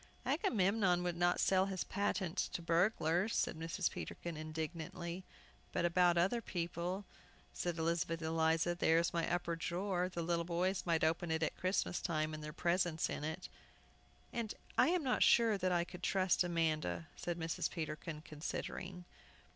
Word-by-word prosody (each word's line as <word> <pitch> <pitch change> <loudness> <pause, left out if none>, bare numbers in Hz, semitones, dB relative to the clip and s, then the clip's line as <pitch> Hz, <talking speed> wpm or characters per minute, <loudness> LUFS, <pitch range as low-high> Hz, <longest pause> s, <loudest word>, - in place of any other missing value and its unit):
"Agamemnon 195 - +2
would 175 -1 -1
not 175 +1 +2
sell 190 0 +3
his 190 -2 -2
patent 195 -3 -1
to - - -1
burglars!" 175 +2 +2
said - - +1
Mrs. 165 +3 -1
Peterkin, 170 -1 -5
indignantly. 160 +3 -5 0.5
"But - - 0
about 175 0 +4
other 195 +8 +2
people," 175 +1 -3 0.5
said 175 -1 -2
Elizabeth 165 0 0
Eliza; 160 +1 +2
"there 165 -2 +3
is 170 0 +2
my 170 -1 0
upper 175 -1 0
drawer; 180 +2 -1
the 170 -2 -3
little 170 0 +1
boys 180 +2 0
might 165 -1 +2
open 165 +2 +1
it 160 0 +1
at - - 0
Christmas 185 -1 0
time, 155 -2 -1
and 155 0 -6
their 150 - -5
presents 175 0 +1
in - - -4
it!" 160 +4 -4 0.9
"And 230 -2 -2 0.2
I - - +5
am 350 -1 +2
not 255 -2 +1
sure 230 -2 +6
that 185 -2 0
I 175 -1 +3
could 180 +1 -10
trust 185 -1 +3
Amanda," 155 - 0
said 175 -1 -3
Mrs. 165 -1 -1
Peterkin, 155 -1 -5
considering. 175 +4 -5
175 Hz, 160 wpm, -36 LUFS, 165-185 Hz, 0.9 s, sure